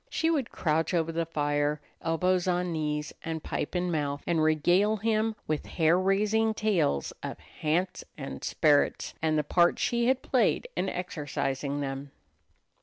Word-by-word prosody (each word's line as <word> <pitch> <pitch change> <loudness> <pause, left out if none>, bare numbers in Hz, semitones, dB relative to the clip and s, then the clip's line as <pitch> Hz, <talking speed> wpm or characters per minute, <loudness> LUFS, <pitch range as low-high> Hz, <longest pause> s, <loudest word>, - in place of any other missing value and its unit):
She 325 0 +1
would 280 -7 0
crouch 160 +2 0
over 165 -1 +1
the 165 0 -2
fire, 145 -1 0 0.2
elbows 180 +2 +1
on 180 0 +1
knees 150 -2 -2
and 160 -1 -4
pipe 150 - -3
in 180 0 0
mouth, 145 -3 -2
and 170 -2 +1
regale 175 +7 +3
him 220 +1 +1
with 155 -1 -2
hair 165 0 +3
raising 210 +4 +2
tales 175 - +1
of - - -5
"hants" 175 +4 -2
and 135 -2 -7
"sperrits" 150 -3 +2
and 155 -1 +2
the 150 - +2
part 175 +3 +3
she 235 0 +1
had 260 0 +2
played 260 - +2
in 190 - 0
exorcising 145 -5 -3
them. 135 0 -4
165 Hz, 155 wpm, -28 LUFS, 150-190 Hz, 0.2 s, regale